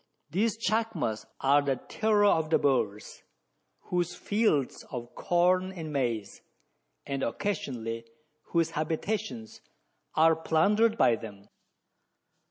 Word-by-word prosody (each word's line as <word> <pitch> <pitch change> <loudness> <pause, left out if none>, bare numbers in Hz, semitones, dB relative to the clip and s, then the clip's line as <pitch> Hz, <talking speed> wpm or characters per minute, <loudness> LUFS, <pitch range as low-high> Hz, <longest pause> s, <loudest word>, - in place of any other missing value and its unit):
These 215 +6 +1
chacmas 220 - -1
are 140 +2 +5
the 140 -1 0
terror 210 - +1
of 160 -6 +3
the 160 - +4
Boers, 115 -7 -1 0.7
whose 175 -1 0
fields 205 - 0
of 120 -1 -7
corn 185 +2 +2
and 160 -5 -7
maize, 115 -7 -2 0.6
and 140 -1 -3
occasionally 115 - -3 0.4
whose 165 -1 +1
habitations, 160 - -3 0.5
are 160 +1 +5
plundered 205 +8 +2
by 115 - +4
them. 100 -2 -11
160 Hz, 105 wpm, -29 LUFS, 125-195 Hz, 0.7 s, are